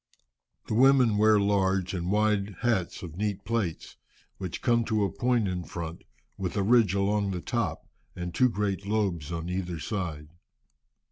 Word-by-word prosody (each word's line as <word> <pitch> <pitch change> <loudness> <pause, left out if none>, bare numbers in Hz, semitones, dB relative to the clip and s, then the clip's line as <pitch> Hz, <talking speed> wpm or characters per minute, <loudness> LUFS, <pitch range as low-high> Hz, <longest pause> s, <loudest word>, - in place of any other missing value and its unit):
The - - -4
women 125 -3 +5
wear 110 0 +5
large 95 -2 +1
and 90 -1 -2
wide 105 -1 +1
hats 115 -9 0
of 85 -2 -8
neat 105 -1 -2
plaits, 105 -8 -3 0.4
which 95 -3 -5
come 120 -1 +3
to 110 -2 +1
a 100 - 0
point 120 -1 +1
in 90 -1 -3
front, 85 -1 -7 0.3
with 95 0 -3
a 100 - +2
ridge 110 -3 +4
along 100 +1 +1
the 90 -2 -2
top, 120 +2 -2 0.3
and 90 -1 -5
two 125 +7 +4
great 100 -3 -2
lobes 95 -8 -1
on 85 0 -4
either 90 -1 -3
side. 80 -5 -4
100 Hz, 160 wpm, -28 LUFS, 90-110 Hz, 0.4 s, women